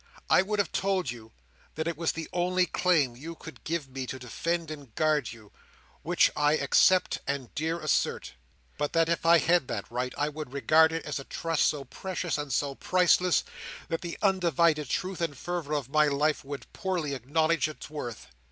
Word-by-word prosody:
I - - +7
would 210 +2 -2
have 205 - 0
told 190 -8 0
you 115 -2 -11 0.4
that 160 +1 -2
it 170 - -1
was 165 +1 0
the 165 -1 -5
only 180 +1 +2
claim 165 -7 +2
that 120 - -16
you 165 +4 -7
could 160 - -12
give 160 -3 -2
me 130 -1 -6
to 130 - -5
defend 165 +6 -3
and 140 -7 -10
guard 150 -7 +1
you, 110 -3 -14 0.5
which - - +3
I 150 +1 +3
dare 140 - -1
accept 185 +6 +4
and 140 -3 -3
dare 160 +3 -1
assert; 155 -2 0 0.5
but 145 - -1
that 165 0 +3
if 170 0 0
I 170 0 +8
had 170 -4 +2
that 100 - -3
right, 125 +1 -2
I 145 - +1
would 150 -3 -7
regard 160 +3 +4
it 165 0 -4
as 145 -2 -3
a - - -7
trust 165 +2 0
so 145 -2 -2
precious 180 +2 -3
and 145 -2 -4
so 140 +2 0
priceless, 180 +3 +3 0.5
that 165 - -2
the 170 -1 -5
undivided 170 -6 +2
truth 185 -1 -2
and 155 -5 -2
fervour 170 -3 -3
of 145 -4 -2
my 150 +1 +4
life 145 +1 +1
would 140 0 -8
poorly 180 -7 -2
acknowledge 155 +5 +1
its 155 - -9
worth." 135 -7 -6
155 Hz, 200 wpm, -28 LUFS, 140-170 Hz, 0.5 s, I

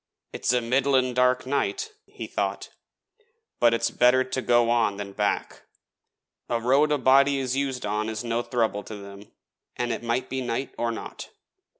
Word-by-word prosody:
'It's - - 0
a 125 -1 +2
middlin' 130 +1 +2
dark 125 +1 +2
night,' 140 - -1 0.2
he - - -8
thought; - - -3 0.9
'but 120 -1 +5
it's 115 0 0
better 125 +1 +4
to 130 0 -3
go 120 -1 +3
on 110 -4 +2
than 100 -1 -6
back 105 0 -2 0.8
a 120 - 0
road 135 +6 +3
a 150 - +3
body 140 +1 +4
is 130 -1 -1
used 135 -3 -2
on 105 +1 -1
is 110 +1 -4
no 115 0 -1
throuble 115 -5 -1
to 110 - -8
them, 100 0 -11 0.5
let 120 -1 -1
it 120 +2 -1
be 130 0 -3
night 125 +2 -3
or 120 0 -1
not.' 115 - -8
120 Hz, 170 wpm, -25 LUFS, 115-130 Hz, 0.9 s, but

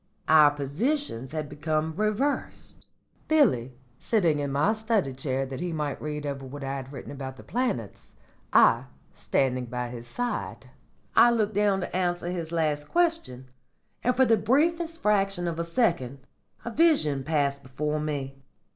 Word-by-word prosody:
"Our 155 -2 +7
positions 145 - -2
had 155 -1 -3
become 155 +2 -2
reversed 215 +8 -2 0.4
Billy 135 - +3 0.2
sitting 170 -10 +1
in 140 -1 -2
my 145 +10 +2
study 220 - 0
chair 135 0 -2
that 135 0 -6
he 175 0 -3
might 150 -3 -3
read 150 -1 -4
over 140 -1 -4
what 135 +2 -8
I 135 0 -3
had 135 0 -8
written 140 - -8
about 135 -2 -7
the - - -12
planets, 220 - -3 0.4
I 120 +3 +5 0.3
standing 125 +4 0
by 125 +1 -4
his 120 -1 -8
side. 245 - -4 0.4
I 240 - +8
looked 220 -3 +1
down 200 -1 +2
to - - -5
answer 175 -1 -1
his 170 -3 -4
last 155 -3 0
question, 325 - 0 0.5
and 250 +1 +2
for 260 - +5
the 225 -2 +4
briefest 330 - +1
fraction 195 -4 +1
of 165 -1 -3
a - - 0
second 165 - 0 0.4
a 235 - -3
vision 225 - +3
passed 140 -2 0
before 150 +3 -3
me. 140 -3 -4
155 Hz, 155 wpm, -27 LUFS, 135-215 Hz, 0.5 s, I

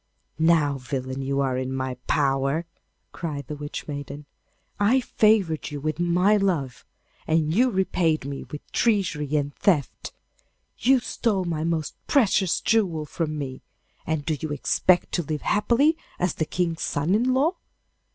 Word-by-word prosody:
'Now, 155 -4 +3
villain, 130 0 -4
you 140 +1 0
are 130 -2 0
in 130 0 -3
my 130 -1 -2
power!' 140 +3 +1 0.5
cried 150 -4 -5
the 150 - -6
Witch 145 +1 -6
maiden. 145 0 -6 0.5
'I 220 +6 +4
favoured 210 -10 +2
you 145 -1 -5
with 155 +3 -3
my 180 +4 +3
love, 160 -11 -1 0.4
and 155 -1 +2
you 250 +7 +4
repaid 180 - +1
me 140 0 -5
with 150 - -8
treachery 170 - +1
and 145 -1 0
theft. 160 -9 0 0.7
You 260 +2 +4
stole 205 -7 -1
my 160 -3 -2
most 165 -2 -1
precious 195 - +3
jewel 185 -9 +1
from 155 0 -3
me, 130 -3 -5 0.5
and 160 -3 -1
do 155 - 0
you 155 - -4
expect 175 +5 +2
to 175 - 0
live 155 -1 -4
happily 245 +9 +3 0.2
as 180 -2 0
the 160 - -1
King's 170 -1 -2
son 150 +5 0
in 240 +5 +2
law? 315 +7 +2
160 Hz, 150 wpm, -25 LUFS, 145-190 Hz, 0.7 s, I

